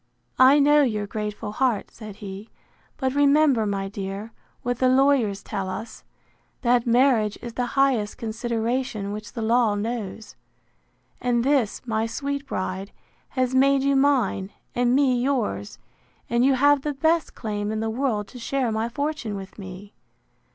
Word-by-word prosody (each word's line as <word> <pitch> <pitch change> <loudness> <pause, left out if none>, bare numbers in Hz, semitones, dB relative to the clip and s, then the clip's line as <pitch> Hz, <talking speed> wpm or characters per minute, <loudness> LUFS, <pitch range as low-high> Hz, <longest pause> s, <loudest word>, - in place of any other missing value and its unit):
I 260 +3 +7
know 295 +1 +5
your 215 -6 0
grateful 210 0 -4
heart, 240 -2 0
said 215 -3 -10
he; 200 +1 -8 0.5
but 260 -2 -1
remember, 285 -5 +4
my 195 -1 -2
dear, 200 +2 -6 0.3
what 245 0 -2
the 255 - +4
lawyers 255 -7 +3
tell 190 -1 -4
us, 220 +4 -7 0.6
That 240 0 +3
marriage 235 -4 +3
is 235 -1 -8
the 245 0 -1
highest 255 -7 +2
consideration 230 -1 -2
which 210 0 -7
the 230 - -4
law 225 -1 +3
knows. 215 -1 -5 0.9
And 245 -1 +1
this, 265 -5 +1
my 225 -1 0
sweet 280 +4 -4
bride, 190 -1 -4 0.4
has 255 -1 -1
made 270 +1 +4
you 275 0 +2
mine, 255 -8 +2 0.2
and 245 0 +2
me 260 -3 +3
yours; 230 - -1 0.5
and 235 +1 +3
you 270 0 +4
have 285 +2 +4
the 295 0 -3
best 320 +4 +1
claim 210 -2 -3
in 220 - -2
the 220 0 -1
world 225 -4 -1
to 250 - -11
share 255 0 -1
my 220 +1 -1
fortune 285 -4 -3
with 195 +1 -9
me. 190 +1 -9
235 Hz, 155 wpm, -24 LUFS, 210-270 Hz, 0.9 s, I